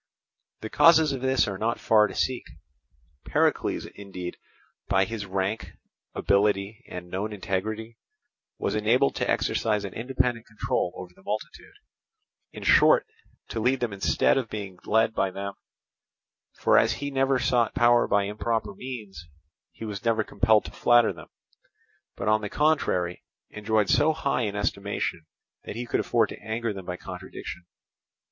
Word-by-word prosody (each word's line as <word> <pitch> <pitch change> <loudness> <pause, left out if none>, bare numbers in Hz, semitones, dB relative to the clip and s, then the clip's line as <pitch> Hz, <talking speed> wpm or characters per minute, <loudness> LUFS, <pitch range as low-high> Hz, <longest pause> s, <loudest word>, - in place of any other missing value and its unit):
The 110 - -5
causes 160 0 +6
of 135 -2 -4
this 130 -2 +2
are 95 -2 -4
not 115 +2 -1
far 105 -1 +4
to - - -9
seek. 130 -2 0 0.8
Pericles - - +1
indeed, 95 -3 -8 0.5
by 95 - +3
his 105 -1 -5
rank, 95 -1 -2 0.4
ability, 100 +1 +1
and 90 0 -7
known 105 +4 -2
integrity, 105 +3 -4 0.6
was - - -1
enabled 115 +6 +2
to - - -1
exercise 105 -2 +1
an 95 - -7
independent 120 -1 -1
control 105 -4 -1
over 90 -1 -9
the 95 - -21
multitude—in 410 - -9
short, - - +5 0.4
to 115 - -3
lead 125 +4 +2
them 120 -5 -2
instead 95 - +2
of 120 -4 -5
being 100 -4 -6
led 110 +1 +3
by 95 -3 +1
them; 100 +1 -5 1.0
for - - +5
as - - +2
he 140 +1 -4
never 135 0 +2
sought 120 -2 +1
power 120 0 +4
by 100 0 +2
improper 105 +1 -2
means, 105 - -8 0.4
he 115 - -8
was 105 -2 -6
never 115 -2 +2
compelled 105 +1 +2
to - - -7
flatter 120 -1 +4
them, - - -12 0.9
but, - - -4
on 110 0 +3
the 105 - -4
contrary, 120 - +1 0.3
enjoyed 105 0 0
so 155 +8 +4
high 140 -4 -1
an 105 -3 -2
estimation 100 -5 -2 0.4
that - - -6
he 120 +1 -4
could - - 0
afford - - +2
to - - -9
anger 110 +1 -2
them 95 -2 -9
by 90 0 -4
contradiction. 90 0 -8
110 Hz, 155 wpm, -26 LUFS, 100-120 Hz, 1.0 s, causes